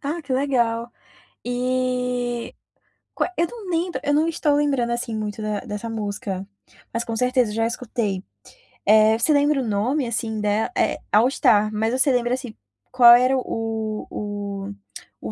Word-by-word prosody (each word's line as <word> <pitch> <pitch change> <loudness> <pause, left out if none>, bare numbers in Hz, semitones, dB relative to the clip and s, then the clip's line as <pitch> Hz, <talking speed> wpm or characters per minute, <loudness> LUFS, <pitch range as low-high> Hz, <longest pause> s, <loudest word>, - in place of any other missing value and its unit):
Ah, 300 +4 -3
que 280 - -5
legal. 240 -4 0 0.5
E 250 -1 -1 0.6
qua 360 - -1
eu 340 - +2
não 440 -3 -9
lembro, 345 +1 -1
eu 290 - +1
não 310 +3 +3
estou 310 -3 +1
lembrando, 275 -5 +1
assim, 235 -1 -2
muito 215 0 -4
da 210 -1 -2
dessa 225 -1 -6
música, 200 -3 -4 0.5
mas 230 +1 -1
com 230 - -4
certeza 250 -1 +1
eu - - -6
já 225 0 +1
escutei. 220 -5 -3 0.6
Eh, 215 +1 +5
você 300 +7 +3
lembra 285 -1 +3
o 245 - -3
nome, 245 +7 0
assim, 225 -1 -2
dela 210 - 0
é - - +1
All 220 +4 +5
Star, 215 -5 +3
mas 220 +2 0
você 260 +2 +3
lembra, 245 -1 +1
assim, 250 -4 -5 0.4
qual 240 -2 +8
era 255 +2 +3
o 225 -3 -3
o 205 -1 -5 0.5
o - - -5
o - - -4
235 Hz, 170 wpm, -23 LUFS, 215-260 Hz, 0.6 s, qual